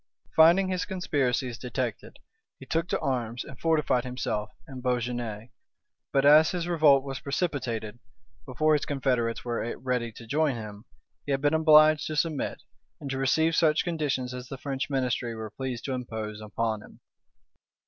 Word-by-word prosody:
Finding 175 +4 +6
his 185 -1 -1
conspiracies 135 - -1
detected, 125 -2 -4 0.4
he - - -11
took 165 +1 -1
to - - -1
arms, 120 -3 -2
and 135 - -12
fortified 155 -6 +2
himself 125 -4 -3 0.2
in 130 -2 -8
Beaugeune; 120 -3 -2 0.6
but 135 0 +2
as 155 +2 +7
his 175 -2 -3
revolt 150 -6 +5
was 135 -2 -5
precipitate, 135 -6 -2 0.6
before 155 +5 +2
his 150 - +2
confederates 125 -5 -1
were 120 -1 -2
ready 125 -2 -2
to 115 - -11
join 145 +3 +1
him, 105 -1 -8 0.4
he - - -1
had 135 0 0
been 145 +1 +2
obliged 155 -1 +6
to 155 - -3
submit, 150 -1 -1 0.4
and 140 -3 -6
to 135 - -2
receive 160 +5 +2
such 160 -2 +3
conditions 145 -7 -2
as 125 0 -7
the 135 - -7
French 135 0 -3
ministry 125 -3 -1
were 110 -1 -6
pleased 130 0 -5
to 135 - -2
impose 110 -4 -5
upon 110 0 -2
him. - - -16
130 Hz, 160 wpm, -27 LUFS, 120-155 Hz, 0.6 s, as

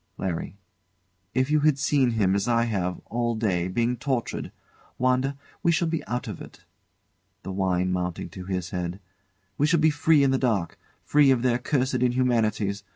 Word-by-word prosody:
LARRY. 90 0 -4 0.8
If 130 +3 +1
you 155 - +4
had 150 -1 +3
seen 140 -2 +2
him, 95 -3 +3
as 100 +2 0
I 115 -1 +3
have, 95 -6 -1
all 120 0 -1
day, 95 -6 0
being 120 +6 0
tortured. 125 -1 -3 0.5
Wanda, 130 +2 +1 0.2
we 170 - +3
shall 170 +1 +1
be 165 -1 -2
out 125 +3 -3
of 105 -6 -6
it. - - -13 0.8
[The 95 - -5
wine 95 -1 0
mounting 90 -1 -3
to 90 +2 -9
his 90 -2 -3
head] 90 0 -3 0.6
We 145 - +4
shall 170 +1 +3
be 155 0 +4
free 150 0 +3
in 135 - +3
the 135 - +1
dark; 105 -10 -1 0.3
free 145 -1 +4
of 130 -2 +3
their 125 -1 +2
cursed 130 0 0
inhumanities. 115 -5 +1
120 Hz, 175 wpm, -25 LUFS, 95-135 Hz, 0.8 s, you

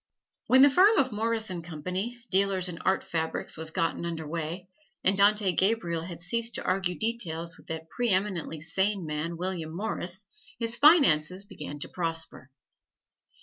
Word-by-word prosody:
When 260 +1 +7
the 285 - +8
firm 400 +9 +6
of 260 -2 +3
Morris 220 0 -1
and 175 -2 -5
Company, 180 +9 -4
Dealers 190 -1 +2
in 170 -2 -6
Art 190 0 +1
Fabrics, 160 -1 -3
was 160 0 -4
gotten 165 +1 -1
under 165 -2 -4
way, 165 +3 -4 0.4
and 190 - +3
Dante 200 0 +4
Gabriel 185 -4 +1
had 170 -1 -7
ceased 230 +7 -1
to - - -3
argue 185 -1 0
details 170 -8 -2
with - - -19
that 160 0 -5
pre 240 +7 -1
eminently 185 -5 0
sane 190 +3 0
man, 155 +2 -3
William 170 -3 -3
Morris, 190 -1 -3 0.3
his 230 0 -1
finances 200 - +5
began 150 -6 -8
to 145 - -3
prosper. 165 -5 -4
185 Hz, 160 wpm, -28 LUFS, 165-210 Hz, 0.4 s, the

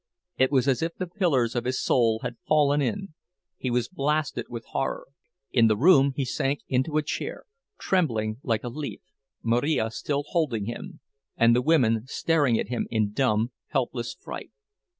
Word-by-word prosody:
It 130 +1 +4
was 130 -2 +2
as 130 -3 +2
if 165 +1 -2
the 185 - -3
pillars 165 - +1
of 120 0 -1
his 130 +1 -1
soul 115 -3 +2
had 120 -1 -4
fallen 145 -1 +3
in—he 175 -2 -5
was 120 -1 0
blasted 150 +2 -1
with 115 -1 -7
horror. 135 - -3 0.4
In 115 -3 +5
the 110 -1 +2
room 140 - +5
he 135 - -1
sank 135 +3 -1
into 130 +4 0
a 155 - +2
chair, 465 - -4 0.3
trembling 115 - 0
like 115 -5 -1
a 120 - -3
leaf, 145 +4 -6 0.4
Marija 115 0 +1
still 145 +5 -2
holding 135 - 0
him, 155 - -7 0.4
and 115 0 +5
the 125 - +3
women 125 -6 +2
staring 145 -5 +2
at - - -3
him 120 -2 -2
in 110 -3 0
dumb, 115 -1 +1 0.2
helpless 120 -3 -2
fright. - - -7
130 Hz, 170 wpm, -26 LUFS, 115-150 Hz, 0.4 s, In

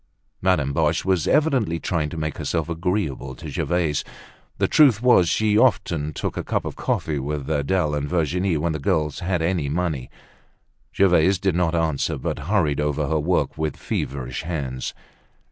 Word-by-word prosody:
Madame 85 -7 +2
Boche - - +1
was 95 -4 +1
evidently 130 - +2
trying 80 -3 -1
to 80 - -7
make 75 -2 -3
herself 80 -1 -1
agreeable 85 -6 -2
to - - -8
Gervaise. 85 -5 0 0.5
The - - +2
truth 140 -9 +5
was 120 -8 +5
she 105 +3 +2
often 85 - +2
took - - -4
a - - -3
cup - - -2
of - - -5
coffee 75 -3 -1
with 70 0 -4
Adele 75 +2 0
and 75 -1 -2
Virginia, 90 +1 0
when 85 +2 0
the 80 - -3
girls 75 -2 0
had 90 -2 -1
any 85 -4 0
money. 80 -5 -2 0.9
Gervaise 95 -1 +4
did 95 0 0
not 85 -1 +1
answer, 80 -4 0
but - - -3
hurried 80 -9 +2
over 75 0 0
her 80 -1 +1
work 75 -2 0
with 80 -3 -2
feverish 65 -2 -3
hands. 70 -7 -4
80 Hz, 165 wpm, -23 LUFS, 75-90 Hz, 0.9 s, truth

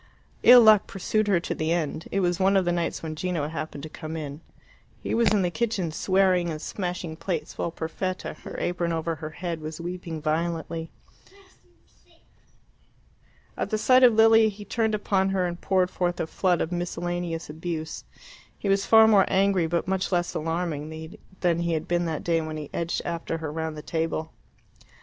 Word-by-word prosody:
Ill 245 0 +9
luck 215 -3 +6
pursued 215 +2 -1
her 195 -4 +3
to - - -3
the 155 +1 -2
end. 160 -1 -2
It 195 - +1
was 175 0 +1
one 195 +1 +4
of 190 - +2
the 175 - +2
nights 170 -1 -2
when 155 -1 -4
Gino 170 -3 -2
happened 155 -2 -6
to - - -5
come 155 +1 -6
in. 150 0 -6 0.6
He - - -4
was 235 0 +3
in 205 -2 +3
the 175 - 0
kitchen, 210 -6 -1
swearing 185 0 +2
and 155 -2 -4
smashing 175 -2 -4
plates, 165 -1 -4
while - - -2
Perfetta, 170 +3 -4
her - - -10
apron 175 -1 -1
over 165 0 -1
her 155 0 -6
head, 170 0 -5
was 155 +1 -6
weeping 175 -1 -5
violently. 165 +1 -2 2.7
At - - -3
the 215 - 0
sight 255 +4 +5
of 245 -3 +7
Lilia 225 0 +6
he 205 0 -10
turned 220 +1 0
upon 195 -2 +1
her 190 -2 +1
and 175 0 -4
poured 185 -1 +1
forth 175 -1 -1
a - - 0
flood 180 +2 +1
of 160 - -2
miscellaneous 175 -1 -3
abuse. 160 0 -5 0.5
He 200 - -3
was 195 0 +2
far 220 0 +8
more 205 -3 +6
angry 190 -3 +2
but 170 +2 -1
much 190 0 -1
less 175 -1 0
alarming 160 -1 -4 0.3
than 170 -2 +2
he 170 0 0
had 160 -1 -2
been 175 0 +1
that 160 -2 -3
day 165 -1 +1
when 155 0 -5
he 150 -2 -7
edged 170 0 -2
after 165 -1 -3
her 160 -2 -5
round 160 0 -4
the 150 - -8
table. 160 -1 -2
175 Hz, 185 wpm, -26 LUFS, 160-190 Hz, 2.7 s, Ill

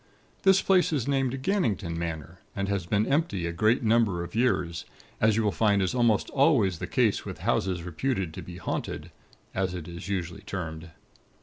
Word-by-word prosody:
This 190 0 +5
place 185 -3 +4
is 140 -5 -1
named 135 -1 0
Gannington 115 - 0
Manor, 85 +1 -5 0.2
and 100 0 -1
has 100 -3 -2
been 105 +3 +2
empty 135 - 0
a 85 - -1
great 110 +9 +2
number 110 -6 +2
of 85 - -9
years; 95 -8 0 0.4
as 110 -1 +4
you 115 - +2
will 105 - +2
find 105 -1 +2
is 95 +2 0
almost 120 -4 +2
always 130 - +3
the - - -4
case - - +2
with - - -7
Houses 90 -2 0
reputed 90 0 -2
to - - -6
be 90 -1 -9
haunted, - - -4 0.4
as 95 -1 -1
it 85 -3 -6
is 85 +3 -8
usually 90 -3 -3
termed. 80 -3 -6
100 Hz, 185 wpm, -27 LUFS, 85-125 Hz, 0.4 s, This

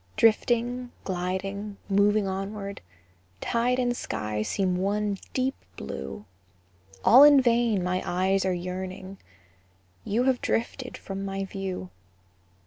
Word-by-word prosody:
Drifting, 240 +2 +2
gliding, 195 +3 -3
moving 205 +1 +3
onward, 195 +1 -4 0.6
Tide 240 +2 +1
and 245 -1 +1
sky 105 - -3
seem 185 - 0
one 200 +1 0 0.2
deep 260 +1 +1 0.2
blue; 70 +8 -6 0.8
All 255 +5 +9
in 290 -1 +9
vain 235 -5 +2
my 185 +1 0
eyes 190 +2 +1
are 190 - +1
yearning, 185 +2 -5 0.8
You 230 +4 +1
have 260 -1 +2
drifted 250 +2 -2
from 195 0 -6
my 195 0 -3
view. 190 - -5
195 Hz, 115 wpm, -27 LUFS, 185-235 Hz, 0.8 s, All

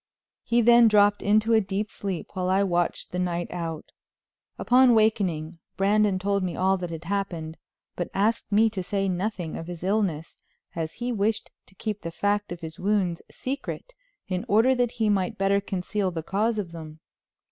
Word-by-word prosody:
He 235 0 +2
then 235 0 +7
dropped 205 -1 +4
into 215 +3 +3
a 220 - +5
deep 200 +1 -3
sleep, 190 -4 -5
while 185 -2 -2
I 190 +2 +3
watched 175 -2 -1
the 180 - -3
night 175 -1 -2
out. 165 -3 -5 0.7
Upon 255 +1 +5
awakening 185 -8 +1 0.2
Brandon 205 0 +3
told 200 +1 0
me 180 -2 -2
all 190 +1 +2
that 180 -1 -5
had 165 0 -6
happened, 175 -4 -3 0.4
but 175 - -3
asked 215 +3 0
me 215 +2 +5
to 195 -3 -3
say 195 +2 -1
nothing 185 -2 -2
of 165 - -7
his 175 -1 -7
illness, 190 -6 -1 0.4
as 160 -1 -3
he 245 +1 -3
wished 215 -1 -1 0.2
to 190 - -22
keep 210 +1 -4
the 170 - -4
fact 205 +4 -1
of 175 - -6
his 160 -1 -8
wounds 190 -3 0
secret 280 - -5 0.3
in 185 -1 -2
order 225 +6 +4
that 245 -2 0
he 220 -2 0
might 205 +1 0
better 195 0 +2
conceal 195 +1 -2
the 165 -3 -5
cause 215 +6 0
of 190 -5 -3
them. 155 -2 -9
195 Hz, 180 wpm, -26 LUFS, 175-215 Hz, 0.7 s, then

